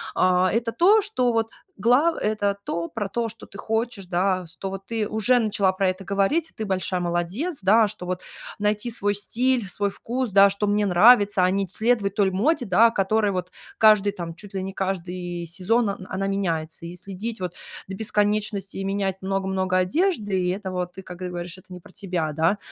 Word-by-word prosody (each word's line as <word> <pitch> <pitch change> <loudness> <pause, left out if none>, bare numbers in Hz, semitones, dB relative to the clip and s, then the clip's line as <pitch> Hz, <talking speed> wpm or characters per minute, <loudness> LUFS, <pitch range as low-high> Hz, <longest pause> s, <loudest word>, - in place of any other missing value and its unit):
А 185 0 +3
это 230 +1 0
то, 410 - +5
что, 255 - 0
вот, 225 0 0 0.3
глав 250 - +3
это 205 -1 0
то 170 0 -3
про 210 -4 -3
то, 230 +3 -2
что 225 - -11
ты 200 - -13
хочешь, 225 -2 -2
да, 185 0 0
что 195 +3 -6
ты 210 +2 -3
уже 220 +3 +2
начала 200 -4 +2
про 190 0 0
это 185 +1 -4
говорить, 200 - 0
и - - -37
ты 220 -2 -5
большая 185 -1 -1
молодец, 175 - -2
да, 215 +3 +5
что, 200 -3 -7
вот, 180 0 -3 0.4
найти 210 +3 0
свой 205 -2 +1
стиль, 240 +3 0
свой 200 +3 -1
вкус, 245 +2 -3
да, 200 0 +7
что 200 +1 -2
мне 205 0 +2
нравится, 200 0 +5
а - - +3
не 195 0 0
следовать 220 -4 0
той 195 -2 +2
моде, 245 - +1
да, 220 +5 +5
которой 205 0 +1
вот 180 -1 -4 0.2
каждый 210 -2 +5
там, 170 -4 -7
чуть 200 +2 -12
ли 190 - -2
не 190 0 -5
каждый 180 -2 -4
сезон, 205 +7 0
он 195 -1 -5
она 195 +1 -2
меняется. 170 -5 -2
И 170 - -7
следить, 200 +4 -6
вот, 180 -1 -4 0.3
до 190 - -6
бесконечности, 210 -1 -1
и 195 - -3
менять 195 -1 -1
много-много 190 -1 -1
одежды, 205 - +1
и 180 - 0
это 190 0 -3
вот 180 -1 -3
ты, 190 - -9
как 180 -1 -10
говоришь, 180 0 -5
это 185 - -18
не 180 - -8
про - - -18
тебя, 180 -6 -3
да. 165 +6 +2
195 Hz, 200 wpm, -24 LUFS, 185-220 Hz, 0.4 s, да